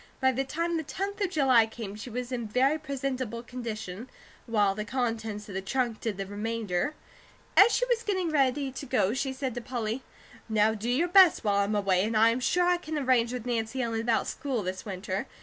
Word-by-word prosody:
By 260 -1 +4
the 265 +1 -1
time 335 +5 -1
the 320 - -2
tenth 400 +7 -4
of 395 - +1
July 260 -8 +4
came, 220 -3 -7
she 215 +4 -8
was 250 +2 -4
in 235 -3 -3
very 265 +8 +2
presentable 260 -5 -3
condition, 225 -3 -6 0.4
while 205 -4 +2
the 210 +2 -4
contents 225 -3 -3
of 200 - -8
the 190 - -2
trunk 235 +2 -1
did 220 -4 -2
the 195 - -3
remainder. 215 +4 -2 0.6
As 415 +4 +8
she - - +2
was 485 -2 +1
getting 375 -6 -1
ready 275 -1 +1
to 275 - -7
go, 230 -5 +2
she 265 +1 -1
said 265 -1 -3
to 245 - -5
Polly: 235 -1 -3 0.5
"Now 220 0 +3
do 220 +2 -4
your 285 +8 +2
best 365 -4 +6
while 205 -2 +2
I'm 200 +1 +1
away, 195 -2 +2
and 220 +1 0
I 225 +1 +6
am 235 - -1
sure 350 +9 +2
I 355 0 +3
can 315 -3 -5
arrange 255 -4 +2
with 250 -2 -5
Nancy 235 +1 -2
Ellen 225 -1 -1
about 230 -1 +1
school 260 -7 -3
this 185 +1 -4
winter. 190 0 -3
240 Hz, 215 wpm, -28 LUFS, 215-275 Hz, 0.6 s, As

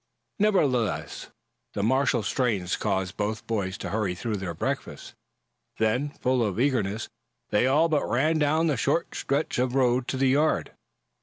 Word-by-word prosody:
Nevertheless, 145 - +1 0.5
the 100 - -1
martial 130 0 +2
strains 105 -6 0
caused 95 -2 -2
both 105 +1 -2
boys 100 -4 -2
to - - -5
hurry 100 -4 -1
through 110 +3 -3
their 90 -3 -5
breakfast. - - -4 0.6
Then, 120 +6 +1
full 130 -3 0
of 105 -1 -2
eagerness, 110 -6 0 0.4
they 105 +4 +3
all 150 +5 +4
but 155 -3 0
ran 155 +6 +2
down 155 +2 +2
the 150 -5 +1
short 145 +8 0
stretch 140 -1 -1
of 125 0 0
road 125 -1 +2
to 130 - -2
the 135 0 +3
yard. 150 +4 +2
125 Hz, 155 wpm, -26 LUFS, 105-140 Hz, 0.6 s, all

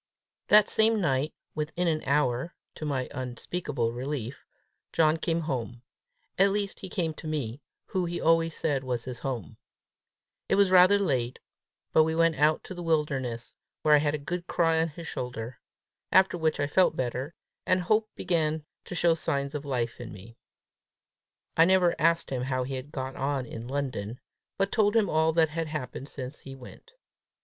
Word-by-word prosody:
That 210 0 +7
same 220 0 +3
night, 140 -4 +1 0.2
within 160 +3 -2
an 155 -2 +1
hour, 140 +1 +1 0.2
to 155 - -6
my 135 -4 -1
unspeakable 130 0 -3
relief, 130 0 -4 0.5
John 160 -1 +3
came 165 0 -1
home 125 -5 -4 0.6
at 195 +1 +6
least 200 -1 -2
he 190 - -7
came 165 -3 -1
to 155 - -9
me, 145 -4 -3 0.2
who 185 -2 -1
he 175 0 -3
always 165 0 +2
said 140 -4 0
was 125 -2 -2
his 125 -2 -6
home. 125 - -5 0.9
It - - +4
was 200 -1 +4
rather 185 +2 +7
late, 130 -11 0 0.6
but 160 - +7
we 160 +1 +1
went 165 -2 +3
out 150 +2 +3
to - - -7
the 175 - -7
wilderness, 135 -8 -1 0.3
where 155 - +5
I 150 - +7
had 145 0 +1
a - - -1
good 175 +5 -4
cry 165 -1 +2
on 165 - +1
his 165 +1 -9
shoulder; 125 -3 -5 0.5
after 190 -1 +5
which 160 -3 0
I 145 - +2
felt 160 +3 +3
better, 130 +4 -3 0.3
and 185 0 +3
hope 215 +4 +2
began 160 -4 0 0.2
to - - -6
show 170 -1 +4
signs 140 -3 -2
of 145 -1 -4
life 120 -4 -2
in 120 - -7
me. 105 +4 -12 1.2
I 165 - +6
never 185 -1 +4
asked 165 -1 +3
him 130 -2 -1
how 130 0 -1
he 135 +2 -5
had 130 +3 -6
got 130 -1 -4
on 135 -1 -1
in 115 0 -7
London, 130 -4 -3 0.4
but 195 0 +1
told 210 -1 +2
him 215 -5 +3
all 160 +1 +3
that 160 -1 +4
had 165 +1 -3
happened 145 -2 -5
since 130 -1 -6
he 135 -1 -10
went. 135 - -14
150 Hz, 180 wpm, -28 LUFS, 130-170 Hz, 1.2 s, That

